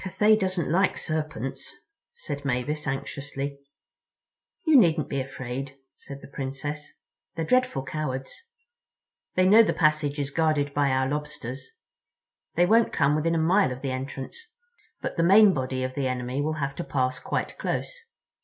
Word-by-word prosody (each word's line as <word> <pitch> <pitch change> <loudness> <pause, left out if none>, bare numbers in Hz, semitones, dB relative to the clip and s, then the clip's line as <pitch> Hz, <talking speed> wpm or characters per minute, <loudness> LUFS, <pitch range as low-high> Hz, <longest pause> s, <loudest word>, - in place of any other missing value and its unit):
"Cathay 210 +4 +4
doesn't 185 -5 -1
like 185 +3 +2
serpents," 155 -5 -4 0.4
said 145 -1 -6
Mavis 140 +3 -2
anxiously. 140 +1 -4 1.1
"You 315 -2 +5
needn't 170 - +4
be 140 -1 -1
afraid," 135 0 -6 0.2
said 140 -1 -10
the - - -9
Princess. 140 +2 -5 0.4
"They're 165 -1 -2
dreadful 255 - +2
cowards. 135 -3 -4 1.0
They 185 - +4
know 210 +4 +8
the 225 - +2
passage 150 -2 +2
is 140 0 -2
guarded 150 -3 +1
by 145 -1 +2
our 130 0 +1
Lobsters. 140 -3 -5 0.9
They 175 - +4
won't 225 +4 +4
come 140 +2 +2
within 165 +2 +1
a - - +2
mile 175 +1 +3
of 125 +2 -7
the 135 - -1
entrance. 130 - -5 0.6
But - - -4
the 165 - +3
main 200 +3 +7
body 130 -2 -2
of 130 0 -3
the 135 -1 -1
enemy 125 +1 -2
will 155 +2 0
have 140 -3 -3
to 175 - -3
pass 130 -4 -1
quite - - -3
close. - - -2
145 Hz, 155 wpm, -26 LUFS, 135-165 Hz, 1.1 s, know